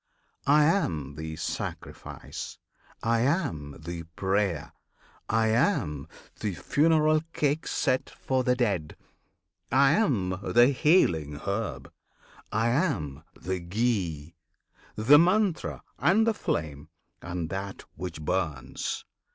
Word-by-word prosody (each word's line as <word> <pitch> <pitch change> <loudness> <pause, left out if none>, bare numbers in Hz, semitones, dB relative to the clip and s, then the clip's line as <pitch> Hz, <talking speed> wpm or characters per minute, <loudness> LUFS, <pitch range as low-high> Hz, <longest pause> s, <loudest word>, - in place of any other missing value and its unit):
I 150 +2 +6
am 85 - +1
the 80 +1 -6
Sacrifice! - - -6 0.5
I 115 0 +2
am 125 - 0
the 85 -1 -6
Prayer! 95 -5 0 0.6
I 110 0 +2
am 90 - +1 0.3
the 100 -4 -2
Funeral 155 - +3
Cake 150 +2 0
set 130 - 0
for 130 -1 -1
the 125 0 +2
dead! 100 -11 -1 0.8
I 135 +2 +5
am 105 - +1
the 120 +2 +5
healing 90 - +3
herb! 100 - -3 0.6
I 115 +2 +1
am 115 - -1 0.2
the 95 0 -3
ghee, 85 -5 -1 0.6
The 130 +8 +7
Mantra, 185 +1 +1 0.2
and 210 +6 +4
the 225 - +3
flame, 75 - -3 0.3
and 85 -1 -4
that 95 +1 -5
which 80 -2 -6
burns! 75 -7 -2
105 Hz, 110 wpm, -28 LUFS, -, 0.8 s, The